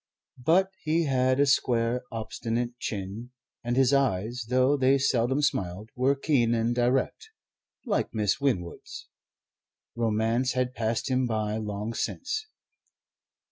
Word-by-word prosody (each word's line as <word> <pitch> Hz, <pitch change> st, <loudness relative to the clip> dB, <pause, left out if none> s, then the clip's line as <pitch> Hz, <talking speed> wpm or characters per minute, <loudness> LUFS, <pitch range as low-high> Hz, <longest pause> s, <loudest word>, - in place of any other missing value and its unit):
But 190 Hz, +7 st, +3 dB
he 160 Hz, +2 st, +1 dB
had 130 Hz, -2 st, +2 dB
a 145 Hz, -, +5 dB
square, 120 Hz, -2 st, +2 dB
obstinate 115 Hz, +2 st, -3 dB
chin, 105 Hz, +4 st, -5 dB, 0.3 s
and 120 Hz, +1 st, -1 dB
his 135 Hz, +1 st, +4 dB
eyes, 120 Hz, -3 st, 0 dB
though 130 Hz, +3 st, +3 dB
they 135 Hz, 0 st, +3 dB
seldom 130 Hz, +1 st, +1 dB
smiled, 95 Hz, -2 st, -1 dB
were 130 Hz, +3 st, +2 dB
keen 130 Hz, -5 st, +2 dB
and 115 Hz, +1 st, +1 dB
direct, 125 Hz, -, 0 dB, 0.6 s
like 215 Hz, -5 st, 0 dB
Miss 105 Hz, -1 st, 0 dB
Winwood's. 100 Hz, -12 st, -3 dB, 0.9 s
Romance 115 Hz, +2 st, +1 dB
had 125 Hz, 0 st, -1 dB
passed 115 Hz, +3 st, -1 dB
him 130 Hz, 0 st, +2 dB
by 110 Hz, -2 st, -1 dB
long 105 Hz, +1 st, -4 dB
since. 435 Hz, -, -3 dB
120 Hz, 125 wpm, -27 LUFS, 110-135 Hz, 0.9 s, a